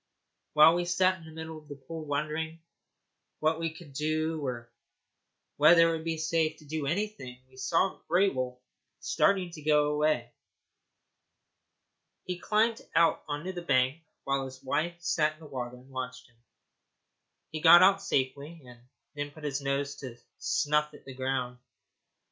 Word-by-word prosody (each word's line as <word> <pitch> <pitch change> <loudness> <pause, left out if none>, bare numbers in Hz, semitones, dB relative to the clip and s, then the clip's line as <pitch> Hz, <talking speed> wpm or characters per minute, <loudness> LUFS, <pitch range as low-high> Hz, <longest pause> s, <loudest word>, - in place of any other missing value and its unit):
While 155 +2 +8
we 175 0 0
sat 185 +1 +2
in 165 - -14
the 160 - -11
middle 160 0 -7
of 150 - -21
the 145 - -8
pool 155 +4 -8
wondering 155 +3 -2 0.8
what 155 +1 +1
we 165 -1 -2
could 160 -3 -13
do 155 +2 -1
or 120 -3 -5 0.9
whether 165 +3 +7
it 165 - 0
would 160 - -6
be 165 0 -2
safe 160 0 0
to 155 - -17
do 150 -1 -3
anything, 170 -8 -3
we 130 0 -21
saw 165 +8 0
Grey 185 +4 +4
Wolf 130 -5 -3 0.4
start 200 - +2 0.2
to 155 - -9
go 150 0 +3
away. 150 -6 0 1.9
He 180 -1 -4
climbed 220 +4 +1
out 165 -1 +4
on 145 0 -4
the 185 -1 -4
bank 130 -1 +1 0.2
while 135 0 0
his 130 0 -11
wife 160 +6 -1
sat 155 -3 +1
in 155 - -23
the 160 - -13
water 125 -4 -5
and 130 +2 -17
watched 125 -1 -6
him. 120 -2 -29 1.1
He 155 - -5
got 175 +2 +9
out 195 +1 +5
safely, 140 +2 -2
and 125 -1 -14 0.3
then 145 -1 -4
put 150 +1 -15
his 145 -1 -2
nose 140 +1 -1
down 130 -4 -8
to 120 - -27 0.2
snuff 150 0 +1
at - - -16
the 135 - -9
ground. 130 -1 -3
150 Hz, 165 wpm, -29 LUFS, 135-165 Hz, 1.9 s, got